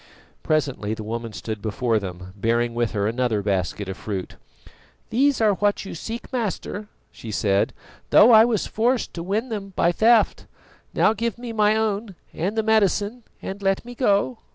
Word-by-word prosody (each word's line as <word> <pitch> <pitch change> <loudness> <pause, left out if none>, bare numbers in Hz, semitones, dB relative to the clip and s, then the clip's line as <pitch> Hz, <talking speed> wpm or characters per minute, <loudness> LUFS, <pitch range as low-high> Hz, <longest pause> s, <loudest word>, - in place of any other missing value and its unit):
Presently 135 -8 -1
the 110 - -7
woman 115 +1 -4
stood 105 +3 -6
before 110 +1 0
them, 90 -1 -8
bearing 115 +3 0
with 120 -1 -1
her 100 -2 0
another 115 -2 0
basket 100 0 -1
of 95 - -4
fruit. 95 -3 -5 0.8
"These 275 +4 +3
are 215 -2 +4
what 205 +1 0
you - - -7
seek, 230 - -7
Master," 215 -2 -3 0.2
she 115 - -10
said, 100 -1 +1 0.4
"though 230 - +7
I 220 -1 +9
was 230 -4 +1
forced 240 +3 0
to 170 - -5
win 210 +8 -2
them 200 -3 -5
by 170 - +3
theft. 225 +5 +3 0.5
Now 215 - +4
give 230 0 -2
me 240 -1 -6
my 210 -1 +3
own 215 -2 -1 0.2
and 195 +7 -2
the 220 - +2
medicine 220 +1 +1 0.2
and 195 +1 -6
let 195 +2 0
me 245 - -8
go." 230 -1 +1
195 Hz, 175 wpm, -23 LUFS, -, 0.8 s, I